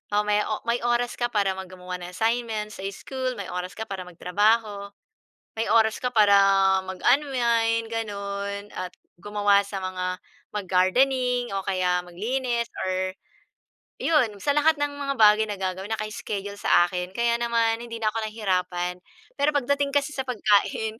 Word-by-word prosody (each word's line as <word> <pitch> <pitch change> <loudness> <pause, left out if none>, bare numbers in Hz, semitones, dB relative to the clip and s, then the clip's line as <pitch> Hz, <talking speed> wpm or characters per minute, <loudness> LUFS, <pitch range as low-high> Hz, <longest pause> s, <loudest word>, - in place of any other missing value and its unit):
O 210 - +3
may 210 0 +2
o 215 - -3
may 235 +1 0
oras 240 0 0
ka 240 - +2
para 205 -5 +1
mag 190 0 -7
gumawa 180 0 -7
ng 175 0 -8
assignment 225 -1 -1
sa 190 - -9
school, 255 +5 -4
may 200 -4 -6
oras 180 +1 -5
ka 220 - -4
para 195 -4 -6
magtrabaho, 200 +3 0 0.6
may 225 - 0
oras 220 -1 +4
ka 250 - -1
para 210 -3 +5 0.5
mag-unwind, 235 0 +1
gano'n. 200 -2 -4
At 180 -1 -5 0.3
gumawa 205 +1 +3
sa 200 -1 -4
mga 185 -1 -3 0.5
mag-gardening 245 +6 +2
o 195 - -2
kaya 180 -1 +1
maglinis 235 +6 -2 0.2
or 185 0 -1 0.9
'yon 275 -10 +3
sa 290 - +2
lahat 315 +2 +4
ng 290 - +1
mga 280 -1 -2
bagay 215 0 +6
na 205 -1 -4
gagawin, 190 +2 -3
naka-schedule 205 -2 -5
sa 175 - +4
akin. 180 +1 -4
Kaya 235 0 +2
naman 230 -1 +1
hindi 235 -1 -7
na 215 -1 +1
ako 225 - -5
nahirapan. 180 -4 -2 0.4
Pero 295 +1 +3
pagdating 285 +1 +1
kasi 285 +1 +2
sa 265 - -2
pagkain, 220 -1 +1
215 Hz, 155 wpm, -25 LUFS, 190-235 Hz, 0.9 s, bagay